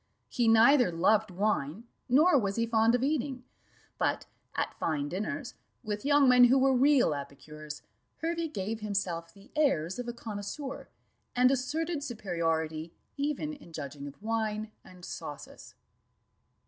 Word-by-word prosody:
He 240 -2 +1
neither 235 +1 +6
loved 205 +6 +3
wine, 190 -2 -1 0.3
nor 305 +8 +5
was 200 -7 +1
he 230 - +1
fond 230 +1 +3
of 245 - 0
eating; 275 -3 -1 0.6
but - - 0 0.3
at - - -1
fine 145 -3 -1
dinners, 230 - -4 0.3
with 210 -2 -4
young 285 -1 +5
men 250 -1 +8
who 255 +2 +5
were 265 0 +4
real 265 - +4
epicures, 150 +2 -8 0.3
Hervey 335 0 -2
gave 220 -6 -4
himself 185 -6 -2
the 200 +3 -19
airs 245 - +1
of 245 - -4
a 240 - -3
connoisseur, 235 +5 -6 0.5
and 250 +1 +5
asserted 300 +5 -1
superiority 165 - -2 0.2
even 300 +1 -2
in 285 - -13
judging 145 -2 -6
of 140 - -11
wine 220 -1 -2
and 180 -1 -13
sauces. - - -9
225 Hz, 140 wpm, -30 LUFS, 175-270 Hz, 0.6 s, men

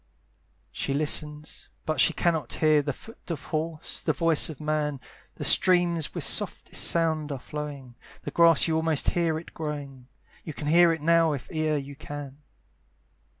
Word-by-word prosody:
She 135 - -3
listens, 150 0 -2 0.2
but 155 -3 -2
she - - +5
cannot 160 -7 0
hear 155 -1 +3
The 145 0 -2
foot 225 - -14
of 160 -5 -4
horse, 160 0 -4
the - - 0
voice 165 -2 +2
of 155 - -8
man; 150 -2 -1 0.4
The - - -6
streams 175 -3 +4
with - - -2
softest - - 0
sound 160 -3 +1
are 140 - -3
flowing, 140 -2 -7 0.3
The - - -5
grass 170 -2 +5
you 160 - 0
almost 160 -2 +1
hear 165 -2 0
it 165 - -10
growing, 140 -5 -6 0.4
You 155 - -7
hear 165 +3 +4
it 160 -2 -4
now 165 -1 +4
if 140 - -7
e'er 155 -1 0
you 140 0 -7
can. 145 -1 -9
155 Hz, 160 wpm, -26 LUFS, 145-165 Hz, 0.4 s, she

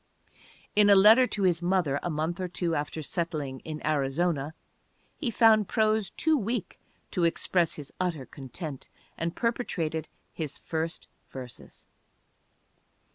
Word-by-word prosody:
In 205 0 +6
a 200 - +9
letter 220 +6 +8
to 205 - -1
his 175 -2 +2
mother 175 -6 +1
a - - -2
month 160 +2 -2
or 185 - -1
two 175 -1 -2
after 150 +1 -3
settling 150 -5 -3
in 155 -1 -7
Arizona 150 +1 0 0.6
he 270 - -1
found 220 -3 +5
prose 215 -2 +1
too 320 -1 +1
weak 230 - -3 0.3
to 180 - 0
express 170 +1 +2
his 145 -2 -9
utter 170 -7 -1
content 135 +3 -7 0.3
and 165 +1 -3
perpetrated 165 -10 -2 0.2
his 155 -4 -4
first 160 0 -4 0.2
verses. 125 -2 -10
170 Hz, 130 wpm, -28 LUFS, 155-200 Hz, 0.6 s, a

